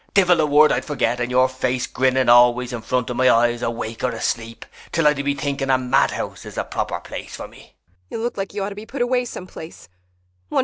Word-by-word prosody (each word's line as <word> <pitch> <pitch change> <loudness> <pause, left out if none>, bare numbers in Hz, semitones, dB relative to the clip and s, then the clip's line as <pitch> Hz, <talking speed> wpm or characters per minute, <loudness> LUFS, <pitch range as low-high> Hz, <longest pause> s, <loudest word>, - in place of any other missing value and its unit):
Divil 180 -4 +5
a 155 - +2
word 150 +1 +5
I'd - - 0
forget, 125 -5 -1
and 120 0 -1
your 130 +1 +4
face 130 -1 -2
grinning 130 0 +1
always 120 +1 +5
in 120 - -4
front 125 +1 -1
of 120 - -4
my 130 0 +4
eyes, 120 +1 +3
awake 115 -1 -4
or 125 - +2
asleep, 115 -1 -4 0.3
'til 165 -2 0
I 150 - +5
do 140 -1 -4
be 140 0 0
thinking 140 -1 -3
a 130 - +4
madhouse 130 +1 0
is - - -10
the - - -1
proper - - -3
place - - -8
for - - -7
me. - - -18
130 Hz, 175 wpm, -21 LUFS, 120-140 Hz, 0.3 s, Divil